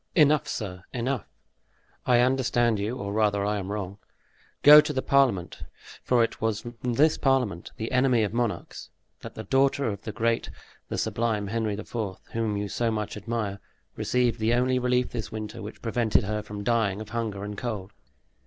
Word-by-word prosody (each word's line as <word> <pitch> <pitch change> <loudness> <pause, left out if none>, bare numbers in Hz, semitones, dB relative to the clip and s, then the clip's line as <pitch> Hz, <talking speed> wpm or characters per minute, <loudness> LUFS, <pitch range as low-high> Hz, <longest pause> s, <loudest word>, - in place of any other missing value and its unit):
Enough, 150 -3 +4
sir, 90 -4 -5
enough. 125 0 -2 0.8
I 120 -1 +5
understand 120 -3 +2
you 110 +5 -2
or 100 -5 -4
rather, 105 -2 +2
I 105 0 0
am 95 +1 -5
wrong. 100 -1 -4 0.6
Go 150 +1 +11
to 150 - -3
the 130 -2 -2
parliament, 130 -10 +2 0.4
for 120 -2 +3
it 115 - -3
was 110 -1 0
from 120 +1 -9 0.2
this 155 +4 +4
parliament, 125 - 0
the 110 - -4
enemy 125 -3 +3
of 105 - -2
monarchs, 120 -2 -3 0.3
that - - -9
the - - -6
daughter 135 +1 +2
of 100 -1 -5
the 110 - -5
great, 115 +2 0 0.4
the - - -3
sublime 110 -3 0
Henry 110 -1 -1
IV., 110 - -9 0.4
whom 110 -2 -1
you 100 0 -2
so 115 +4 -1
much 105 -2 -3
admire, 105 -2 -3 0.4
received 125 -2 +1
the 115 +2 +2
only 125 +1 +2
relief 125 0 +1
this 115 -2 -5
winter 110 -1 -6
which 105 +2 -9
prevented 115 -1 +2
her 105 +2 -2
from 105 0 -7
dying 110 -3 +1
of 110 0 -8
hunger 110 -4 -3
and 105 0 -5
cold!" 105 -6 -4
115 Hz, 180 wpm, -26 LUFS, 105-125 Hz, 0.8 s, Go